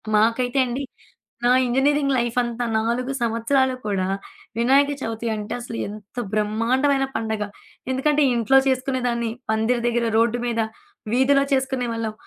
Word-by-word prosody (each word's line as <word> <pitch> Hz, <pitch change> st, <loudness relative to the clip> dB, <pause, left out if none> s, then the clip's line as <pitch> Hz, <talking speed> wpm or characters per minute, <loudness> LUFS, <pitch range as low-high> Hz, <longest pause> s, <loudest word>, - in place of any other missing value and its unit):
మాకైతే 230 Hz, +4 st, +2 dB
అండి 255 Hz, +4 st, -3 dB, 0.6 s
నా 245 Hz, -, +4 dB
ఇంజినీరింగ్ 275 Hz, +3 st, +2 dB
లైఫ్ 240 Hz, 0 st, -1 dB
అంతా 240 Hz, 0 st, -3 dB
4 240 Hz, +4 st, -1 dB
సంవత్సరాలు 240 Hz, +3 st, +1 dB
కూడా, 195 Hz, -3 st, 0 dB, 0.5 s
వినాయక 275 Hz, +5 st, +4 dB
చవితి 225 Hz, 0 st, -4 dB
అంటే 210 Hz, -1 st, -5 dB
అసలు 230 Hz, -1 st, -6 dB
ఎంత 210 Hz, +3 st, -11 dB, 0.2 s
బ్రహ్మాండమైన 245 Hz, +6 st, +1 dB
పండగ. 220 Hz, -2 st, -1 dB, 0.5 s
ఎందుకంటే 295 Hz, +3 st, +2 dB
ఇంట్లో 235 Hz, +3 st, +4 dB
చేసుకునేదాన్ని, 255 Hz, -3 st, 0 dB, 0.2 s
పందిరి 220 Hz, +2 st, +1 dB
దగ్గర, 240 Hz, 0 st, +1 dB
రోడ్డు 235 Hz, +1 st, +2 dB
మీద 230 Hz, -1 st, 0 dB, 0.5 s
వీధిలో 275 Hz, +2 st, +4 dB
చేసుకునేవాళ్ళం. 245 Hz, -4 st, -1 dB
240 Hz, 120 wpm, -23 LUFS, 225-265 Hz, 0.6 s, నా